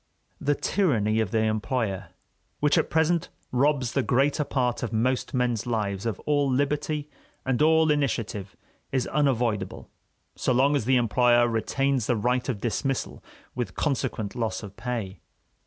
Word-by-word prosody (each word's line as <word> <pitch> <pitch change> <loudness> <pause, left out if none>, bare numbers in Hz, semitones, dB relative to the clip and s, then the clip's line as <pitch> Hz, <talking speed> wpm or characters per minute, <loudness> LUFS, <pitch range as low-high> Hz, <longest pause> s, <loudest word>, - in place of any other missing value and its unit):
The 145 +1 +1
tyranny 115 - +1
of 110 -4 0
the 110 +1 +1
employer, 110 -3 -1 0.5
which 150 0 +3
at - - +2
present 160 +1 +1 0.2
robs 130 -1 +2
the 140 - +1
greater 140 +4 +2
part 125 -4 -1
of 120 - -3
most 125 +5 0
men's 125 -3 0
lives 105 -3 -1
of 110 - -3
all 145 -2 +1
liberty 145 +2 0 0.4
and 130 0 0
all 160 0 +5
initiative, 115 -9 -1 0.4
is 130 -2 0
unavoidable 120 -9 -1 0.4
so 130 - 0
long 135 +4 +3
as 135 - 0
the 130 +2 +3
employer 120 0 +4
retains 130 +2 0
the 120 - +2
right 125 +4 0
of 115 -6 -2
dismissal 130 +3 -2 0.3
with 120 -1 -4
consequent 130 -8 -1
loss 115 -2 -2
of 100 -1 -9
pay. 115 -4 -4
125 Hz, 150 wpm, -26 LUFS, 110-140 Hz, 0.5 s, all